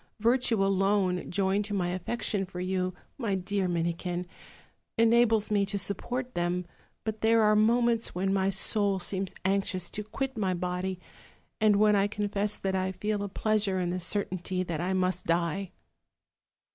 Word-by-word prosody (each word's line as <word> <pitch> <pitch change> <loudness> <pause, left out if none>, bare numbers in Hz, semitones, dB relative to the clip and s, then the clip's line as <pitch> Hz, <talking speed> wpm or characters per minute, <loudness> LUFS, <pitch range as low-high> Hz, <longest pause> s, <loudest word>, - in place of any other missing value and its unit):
Virtue 230 -2 +2
alone, 195 -2 +1
joined 195 +2 +1
to 205 -1 -3
my 180 -2 0
affection 195 +2 -1
for 180 -1 -7
yfcu, 185 0 -1 0.2
my 215 -6 0
dear 190 +1 -1
Minikin, 175 +1 -2 0.7
enables 225 -2 +4
me 205 -1 +3
to 200 +1 -2
support 245 +6 -3
them; 175 +1 -1 0.4
but 220 0 -4
there 225 0 +4
are 210 0 +5
moments 230 +1 +2
when 190 +2 0
my 195 0 +2
soul 195 0 +2
seems 190 +1 -2
anxious 190 -2 0
to 210 - -3
quit 265 +5 -4
my 190 -3 +1
body, 180 +1 -3 0.6
and 215 -2 +4
when 210 +1 +4
I 200 0 +3
confess 205 0 -1
that 190 -1 -2
I 190 0 -1
feel 210 +2 -2
a 200 - -3
pleasure 205 -1 0
in 175 -1 -1
the 185 - -2
certainty 185 -1 -1
that 170 -3 -3
I 185 +2 -1
must 185 -1 0
die.' 170 +3 0
195 Hz, 160 wpm, -29 LUFS, 185-210 Hz, 0.7 s, are